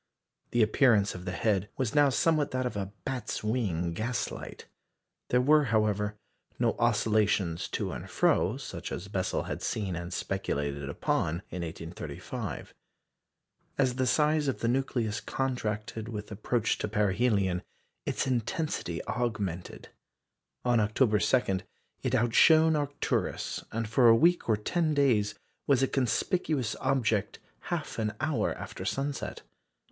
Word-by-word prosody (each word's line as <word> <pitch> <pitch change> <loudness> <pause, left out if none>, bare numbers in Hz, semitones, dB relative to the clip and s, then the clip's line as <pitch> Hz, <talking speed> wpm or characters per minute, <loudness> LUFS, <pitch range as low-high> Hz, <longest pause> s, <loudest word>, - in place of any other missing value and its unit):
The 120 -1 +3
appearance 110 -2 +4
of 90 0 -8
the 90 - -2
head 100 +1 0
was 130 -5 -1
now 145 -1 +5
somewhat 155 +2 +2
that 130 0 -1
of 125 - -3
a 100 -1 -3
"bat's 125 -6 -3
wing" 95 -7 0
gaslight. 120 +8 -4 0.6
There 125 - +4
were, 150 +3 +5
however, 105 -2 +1 0.4
no - - +1
oscillations 105 -6 +2
to - - -3
and - - -7
fro, - - +2
such - - -7
as 100 +3 -5
Bessel 95 -2 -1
had - - -5
seen 100 -5 -2
and 85 +1 -5
speculated 70 -8 -2
upon 80 +4 -1
in 90 - -4
1835. 85 +1 -6 1.0
As 130 -2 +2
the 130 -1 +1
size 150 +5 +3
of 135 - -1
the 115 - +1
nucleus 120 -4 0
contracted 110 -4 -3
with 105 -2 -6
approach 110 +2 0
to - - -1
perihelion, 100 -3 +1 0.4
its - - -1
intensity 125 - -2
augmented. 100 -8 -3 0.8
On 120 -1 +4
October 105 +1 +3
2, 105 -2 +2 0.4
it 130 -1 0
outshone 155 +7 +5
Arcturus, 145 -1 -2
and 115 0 -2
for 120 +3 +4
a 115 - +8
week 170 +3 +3
or 110 - +4
ten 155 +8 0
days 115 -7 +3 0.3
was 135 -2 +4
a - - +4
conspicuous 135 - 0
object 120 -6 +1 0.3
half - - -3
an 105 -1 -1
hour 155 -1 0
after - - -7
sunset. 140 +1 -3
110 Hz, 135 wpm, -29 LUFS, 100-130 Hz, 1.0 s, a